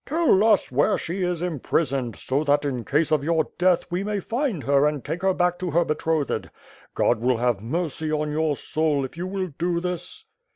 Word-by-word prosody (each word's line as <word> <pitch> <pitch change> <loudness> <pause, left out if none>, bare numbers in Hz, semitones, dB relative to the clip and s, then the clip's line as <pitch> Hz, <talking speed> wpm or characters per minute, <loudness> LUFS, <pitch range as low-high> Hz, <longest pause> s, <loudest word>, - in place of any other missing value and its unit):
'' - - -53
"Tell 310 - +3
us 215 - +3
where 145 +10 +2
she 175 +4 -4
is 175 -2 -1
imprisoned, 135 - -1
so 135 +3 -1
that, 145 0 +2
in 130 -4 -2
case 150 +6 +1
of 150 -3 +2
your 160 0 +1
death, 180 -1 +3
we 180 +2 -1
may 205 0 -1
find 230 - -2
her 140 +1 +3
and 150 -4 -3
take 175 - -3
her 190 0 +3
back 180 -1 +1
to 180 -1 -2
her 170 +2 +2
betrothed. 155 -1 -1 0.5
God 120 - +2
will 125 +1 +1
have 120 -4 0
mercy 155 +4 -2
on 150 0 -1
your 155 -1 0
soul 155 -3 0
if 130 - -9
you 175 +2 -4
will 190 -1 -3
do 170 0 0
this." 180 - -5
160 Hz, 210 wpm, -24 LUFS, 145-180 Hz, 0.5 s, Tell